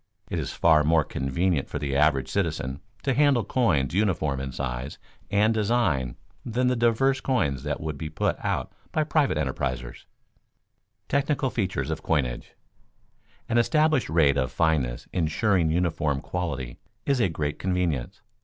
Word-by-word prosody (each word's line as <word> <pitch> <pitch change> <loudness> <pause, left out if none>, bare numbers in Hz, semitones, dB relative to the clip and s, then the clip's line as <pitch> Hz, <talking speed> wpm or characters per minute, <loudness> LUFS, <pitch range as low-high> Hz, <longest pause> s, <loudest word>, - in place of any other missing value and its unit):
It - - -1
is - - -3
far 80 -2 +4
more 80 +1 +3
convenient 70 +4 -1
for - - -3
the 70 -1 -2
average 70 -2 +3
citizen 65 +4 -2 0.2
to 135 - +1
handle 140 -3 +3
coins 90 - +1
uniform 80 -9 +1
in 65 0 -4
size 65 +1 -4 0.3
and 105 +2 +3
design 100 - +1 0.3
than 125 +2 -1
the 125 - +1
diverse 120 +3 +2
coins 70 - 0
that 75 +1 -3
would 75 -3 -5
be 80 0 -4
put 80 - 0
out - - -2 0.2
by 155 - +1
private 150 - +1
enterprisers. 65 -4 -3 1.0
[Sidenote: - - -42
Technical 140 -1 +1
features 100 -6 -2
of - - -3
coinage] 65 -7 -1 0.9
An 120 +1 +2
established 155 - +2
rate 75 -4 +3
of 65 -2 0
fineness 70 -7 0
insuring 90 +1 +1
uniform 80 -4 0
quality 70 -8 -4 0.3
is 140 -2 +2
a 110 - +3
great 75 -2 -3
convenience. 90 -9 -1
80 Hz, 150 wpm, -26 LUFS, 70-115 Hz, 1.0 s, far